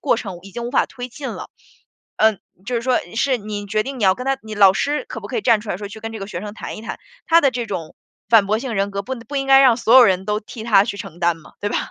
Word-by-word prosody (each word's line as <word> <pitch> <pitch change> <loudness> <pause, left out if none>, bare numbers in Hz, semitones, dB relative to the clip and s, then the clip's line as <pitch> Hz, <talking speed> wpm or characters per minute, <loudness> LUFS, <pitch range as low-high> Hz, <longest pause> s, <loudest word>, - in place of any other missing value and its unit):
过 270 - +2
程 190 -6 -6
已 195 - -12
经 235 +5 -6
无 240 - -4
法 - - +2
推 250 -1 -8
进 270 +2 -7
了。 - - -7 0.7
呃， 220 -2 +4 0.3
就 250 - -2
是 235 - 0
说， 255 0 +2 0.2
是 260 +1 +1
你 205 -1 -6
决 215 +1 0
定 270 +2 -6
你 - - -2
要 190 -1 +5
跟 250 +6 -7
他 270 0 +1
你 215 0 -8
老 195 -2 +6
师 295 - -1
可 - - -6
不 - - -7
可 - - -3
以 - - -1
站 230 - +3
出 215 - -10
来 180 - -2
说， 205 0 -6
去 220 +2 -10
跟 225 0 -5
这 220 - -7
个 195 - -6
学 175 -3 -6
生 210 0 -7
谈 - - -7
一 - - -9
谈， - - -6 0.3
他 335 0 +6
的 275 - +4
这 240 -2 -4
种 180 -6 -6 0.3
反 220 -4 +6
驳 215 +2 0
型 250 -3 -4
人 195 +1 0
格 200 0 -3
不 260 +5 -5
不 250 +5 -9
应 270 0 -1
该 270 0 +7
让 250 -3 +5
所 235 +1 +4
有 255 - +10
人 190 -3 +2
都 210 +1 0
替 220 +1 -10
他 205 -4 +5
去 200 - -5
承 170 -2 -9
担 170 -1 +1
嘛， 160 - -17
对 205 - -1
吧？ - - 0
220 Hz, 340 characters per minute, -20 LUFS, 200-250 Hz, 0.7 s, 有